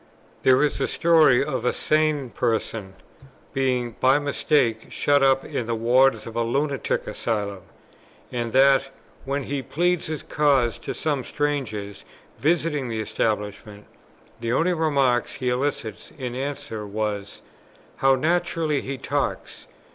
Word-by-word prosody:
There 130 +2 +5
is 150 - 0
a - - +1
story 155 -6 +4
of 135 -6 -3
a 125 - +2
sane 155 -4 +1
person 110 -4 -2 0.6
being 125 -3 0
by 130 +2 +5
mistake 140 -5 +1
shut 145 -1 +2
up 135 0 +3
in 115 - -3
the 115 - 0
wards 125 +4 +3
of 115 - -8
a 120 - +1
Lunatic 140 +4 -1
Asylum, 105 -3 -3 0.7
and 120 -2 -3
that, 135 +1 +4 0.4
when 140 +1 -2
he 140 +1 -3
pleaded 175 +5 0
his 155 -2 -4
cause 140 -6 +2
to - - -5
some 145 -4 -1
strangers 120 -10 -3 0.4
visiting 150 -3 +1
the 115 -2 -3
establishment, 105 -1 -3 0.5
the 115 0 -2
only 175 +6 +2
remark 140 -7 +2
he 125 - -3
elicited 125 0 -3
in 125 -2 -4
answer 130 -5 -4
was, 105 -1 -4 0.5
"How 135 0 +4
naturally 165 0 0
he 135 0 -5
talks! - - -3
130 Hz, 135 wpm, -24 LUFS, 115-145 Hz, 0.7 s, There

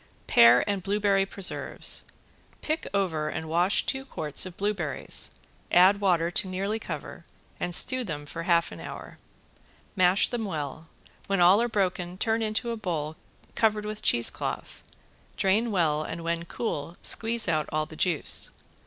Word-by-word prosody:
~PEAR 120 +1 +6
AND 200 -2 -2
BLUEBERRY 200 0 +1
PRESERVES~ 195 -1 -2 0.6
Pick 310 +1 -2
over 165 -6 -1
and 160 - -5
wash 175 +5 +2
two 265 0 0
quarts 160 - -3
of 180 - -12
blueberries, 195 -8 -1 0.4
add 190 +3 +5
water 175 -3 +2
to 190 - +4
nearly 195 +4 -2
cover - - -7 0.4
and 175 - +1
stew 255 +6 +6
them 150 -8 -6
half 170 +2 0
hour. - - -9 0.8
Mash 185 0 +4
them 235 -3 -3
well, 155 -3 -5 0.4
when 195 -1 0
all 180 +5 +6
are 240 - 0
broken 185 -4 -2
turn 225 +3 0
into 220 +2 -1
a - - -2
bowl 160 -7 -3 0.4
covered 215 -2 +1
with 210 0 -5
cheese 120 -1 +3
cloth. - - -6 0.6
Drain 210 +5 +2
well 160 -7 +1
and 165 +2 -6
when 170 0 -2
cool 170 -5 -4
squeeze 230 0 +1
out 155 -2 0
all 155 0 0
the 155 - -12
juice. 170 -2 0
185 Hz, 150 wpm, -27 LUFS, 165-210 Hz, 0.8 s, ~PEAR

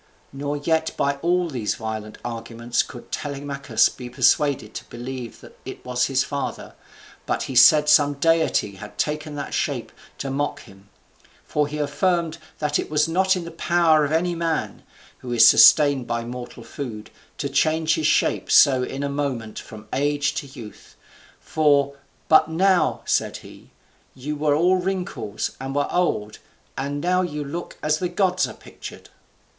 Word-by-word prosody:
Nor 145 +1 -3
yet 160 +2 -1
by 140 0 0
all 175 +4 +1
these 125 -9 -2
violent 110 -1 -6
arguments 115 0 -2
could 120 - -10
Telemachus 140 -1 0
be 125 -1 -8
persuaded 130 -2 +2
to - - -7
believe 120 0 -7
that - - -15
it - - -9
was 125 -1 0
his 135 -1 +1
father, 140 -1 -5 0.5
but - - -1
he - - -5
said 150 +5 +7
some 145 -1 +5
deity 160 -10 +1
had 105 +2 -11
taken 150 0 -2
that 145 -1 -5
shape - - -2 0.3
to 135 - -4
mock 145 +2 -2
him; 95 +1 -17 0.6
for 150 -1 0
he 150 +1 -6
affirmed 165 +2 0 0.2
that 150 -1 0
it - - -4
was 150 +1 +2
not 190 +3 +2
in 180 -2 -4
the 170 - -7
power 165 -2 +3
of 145 - -1
any 175 +2 +1
man, 165 -2 -2 0.4
who 125 - -7
is 120 - +7
sustained 145 -4 +6
by 115 0 -2
mortal 120 0 -8
food, 115 -7 -7 0.3
to - - -2
change 160 0 +1
his 155 -1 +1
shape - - +1
so 135 -3 +6
in 135 +2 -4
a - - 0
moment 135 -6 -3
from 110 0 -12
age 145 +1 0
to 140 - -5
youth: 115 -5 -12 0.4
for, 140 -2 +2 0.3
"but 160 0 +5
now," 180 +1 +2
said - - 0
he, - - -14 0.5
"you 145 +4 -5
were 145 0 +1
all 180 +4 +3
wrinkles, 180 - -3
and 135 +1 -5
were 145 - +1
old, 110 -12 -1 0.4
and 140 +1 -3
now 180 +2 +2
you 150 -5 -3
look 165 +5 -7
as 155 0 +1
the 180 - -1
gods 185 0 +1
are - - -9
pictured." - - -11
145 Hz, 165 wpm, -23 LUFS, 125-160 Hz, 0.6 s, said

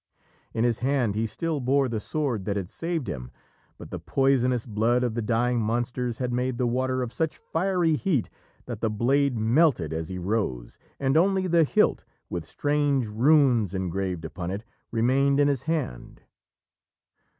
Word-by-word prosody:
In 115 - +1
his 120 -2 +1
hand 130 -5 +1
he 110 +2 -1
still 160 +5 -2
bore 135 +1 +2
the 115 -3 -2
sword 125 -6 -2
that 100 -1 -1
had 95 0 -4
saved 165 -3 -3
him, 60 -2 -5 0.5
but - - -11
the - - -4
poisonous 130 -3 +1
blood 115 +2 +1
of 120 -3 0
the 115 - -2
dying 120 +2 +1
monsters 120 +2 -1
had 125 -1 -2
made 125 0 -1
the 125 - +1
water 130 +1 0
of 120 - -6
such 160 -2 -1
fiery 175 -2 0
heat 150 - 0 0.4
that 120 -4 -6
the 110 - +1
blade 125 +4 +1
melted 110 - +2
as 80 0 -4
he 95 - -5
rose, 90 - -2 0.2
and 135 +1 +1
only 190 +2 +3
the 170 -2 +4
hilt, - - +2 0.3
with 85 -2 -3
strange 145 -3 +1
runes 120 - +3
engraved 95 -2 -2
upon 85 +3 -5
it, 100 +3 -4 0.3
remained 135 +5 +2
in 145 - +5
his 140 -4 0
hand. 155 - -4
125 Hz, 170 wpm, -26 LUFS, 105-140 Hz, 0.5 s, in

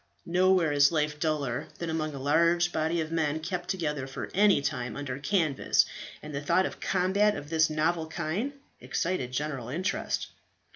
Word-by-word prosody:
Nowhere 180 -2 +3
is 145 +1 +5
life 150 -2 0
duller 145 -6 -1
than 170 -1 -3
among 155 -2 -2
a - - -6
large 170 +5 +3
body 160 +1 0
of 160 0 -4
men 160 -2 0
kept 180 +2 -4
together 150 -7 -2
for 135 - -6
any 200 -2 +5
time 125 -4 -3
under 140 -2 -4
canvas, 155 -2 +2 0.4
and 150 0 -7
the 140 - -3
thought 170 +6 +2
of - - -3
a - - -15
combat 195 +3 +2
of 145 +2 -8
this 160 -1 +3
novel 160 +1 0
kind 185 - -2 0.3
excited 170 -8 -2
general 135 -3 -3
interest. 180 +9 -2
160 Hz, 175 wpm, -28 LUFS, 145-175 Hz, 0.4 s, is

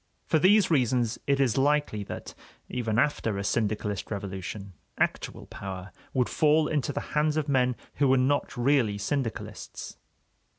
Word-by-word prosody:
For 160 - +2
these 200 +3 +5
reasons 125 -5 +2
it 140 -1 +2
is 135 -2 +2
likely 145 -6 +1
that, - - -7 0.4
even 115 -3 -1
after 115 -7 +1
a 100 - -2
syndicalist 105 -1 -1
revolution, 100 -1 -5 0.2
actual - - -1
power 95 0 -7 0.2
would 125 -2 +1
fall 155 0 +3
into 145 -2 0
the - - -3
hands 150 +1 +2
of 155 -1 0
men 125 -3 +2 0.2
who 140 - +3
were 130 0 +5
not 135 +1 +1
really 120 -5 +2
syndicalists. 110 - -4
125 Hz, 145 wpm, -28 LUFS, 105-145 Hz, 0.4 s, these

